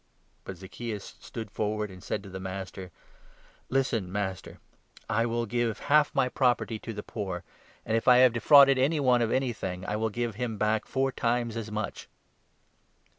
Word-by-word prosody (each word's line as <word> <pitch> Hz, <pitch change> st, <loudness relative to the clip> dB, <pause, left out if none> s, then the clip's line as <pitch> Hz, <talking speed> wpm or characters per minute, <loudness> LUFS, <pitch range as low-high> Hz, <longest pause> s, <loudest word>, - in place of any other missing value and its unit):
But 95 Hz, -, -7 dB
Zacchaeus 100 Hz, +3 st, -7 dB
stood 110 Hz, -3 st, -8 dB
forward 105 Hz, -1 st, -2 dB
and 90 Hz, -1 st, -12 dB
said 100 Hz, -, -3 dB
to 100 Hz, -, -10 dB
the 95 Hz, -, -6 dB
Master: 95 Hz, 0 st, -6 dB
8 90 Hz, -, -16 dB, 0.5 s
" -, -, -31 dB
Listen, 115 Hz, -9 st, 0 dB
Master! 95 Hz, -2 st, -4 dB, 0.5 s
I 115 Hz, +1 st, +1 dB
will 120 Hz, 0 st, -1 dB
give 115 Hz, 0 st, -1 dB
half 150 Hz, +1 st, +3 dB
my 135 Hz, -2 st, +3 dB
property 125 Hz, -3 st, +1 dB
to 115 Hz, -, -7 dB
the 105 Hz, -1 st, -6 dB
poor, 95 Hz, -5 st, -5 dB, 0.4 s
and, 110 Hz, -, 0 dB
if 115 Hz, -, -1 dB
I 125 Hz, -1 st, +8 dB
have 125 Hz, -2 st, +6 dB
defrauded 135 Hz, +2 st, +7 dB
any 150 Hz, +4 st, +2 dB
one 125 Hz, -3 st, +3 dB
of 115 Hz, -, +1 dB
anything, 105 Hz, -8 st, -2 dB
I 105 Hz, -, -2 dB
will 110 Hz, +1 st, 0 dB
give 120 Hz, +1 st, -2 dB
him 115 Hz, -3 st, -2 dB
back 110 Hz, +1 st, +1 dB
four 135 Hz, 0 st, 0 dB
times 120 Hz, -2 st, -1 dB
as 115 Hz, -1 st, -4 dB
much." 105 Hz, -1 st, -4 dB
115 Hz, 180 wpm, -28 LUFS, 100-125 Hz, 0.5 s, I